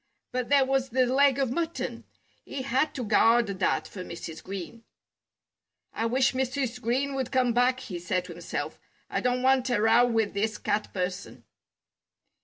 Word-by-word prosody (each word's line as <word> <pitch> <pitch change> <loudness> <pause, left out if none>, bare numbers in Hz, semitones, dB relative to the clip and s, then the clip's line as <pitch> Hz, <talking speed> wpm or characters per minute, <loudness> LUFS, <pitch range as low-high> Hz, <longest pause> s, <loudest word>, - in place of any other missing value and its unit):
But 250 -1 -2
there 280 -2 +5
was 270 0 0
the 255 +1 +2
leg 270 +2 +4
of 270 -3 0
mutton! 335 +4 -3 0.4
He 275 -2 -5
had 265 +4 0
to 255 - -3
guard 230 +2 +4
that 195 -2 -1
for 185 - -8
Mrs. 170 -2 -8
Green. 195 +4 -7 1.1
"I 225 - -1
wish 260 +3 +2
Mrs. 255 -1 -2
Green 265 +4 0
would 265 -2 -3
come 255 -2 +2
back," 250 +2 +2
he 190 -9 -6
said 180 +1 -1
to 180 - -9
himself. - - -5 0.3
"I - - 0
don't 250 0 0
want 260 -1 +3
a 235 - +2
row 225 +3 +5
with 225 -3 0
this 210 +1 -1
Cat 210 -3 -1
person." 185 0 -4
245 Hz, 170 wpm, -27 LUFS, 210-265 Hz, 1.1 s, there